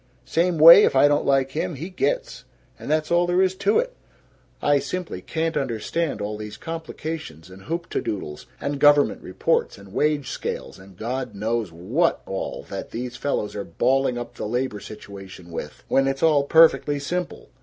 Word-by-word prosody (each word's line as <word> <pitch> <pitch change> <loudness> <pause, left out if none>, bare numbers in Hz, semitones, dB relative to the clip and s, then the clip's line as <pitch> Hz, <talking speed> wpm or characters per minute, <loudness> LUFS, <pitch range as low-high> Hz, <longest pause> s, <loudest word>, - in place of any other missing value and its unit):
Same 170 0 +1
way, 170 +6 +10
if - - +2
I 135 +2 +6
don't 145 0 +1
like 135 -1 +2
him, 155 +3 -3
he 165 +8 -7
gits. - - -2 0.4
And - - -8
that's 155 +1 0
all 175 +1 +3
there 180 +2 +3
is 185 -1 +1
to 420 - +2
it. - - -1 0.6
I 145 -1 +3
simply 180 +3 -5
can't 165 0 -2
understand 135 +1 -2
all 105 +1 -3
these 105 0 -8
complications 160 - -7
and 95 +1 -13
hoop 170 +2 -3
te - - -2
doodles 75 -7 -5
and 140 0 -3
government 145 0 +4
reports - - -1
and 100 -1 -14
wage 150 -3 0
scales - - -5
and 95 -1 -16
God 125 +1 -4
knows 110 -1 -2
what 110 - 0
all 95 - -5
that - - -5
these 120 +1 -5
fellows 140 -7 -2
are 100 - -3
balling 130 +8 +1
up 120 0 -6
the 105 - -5
labor 120 -2 -2
situation 95 -4 -11
with, 85 - -7
when 135 0 +2
it's 135 0 -2
all 150 -3 +4
perfectly 160 -2 +5
simple. 175 +5 -4
140 Hz, 180 wpm, -23 LUFS, 105-165 Hz, 0.6 s, way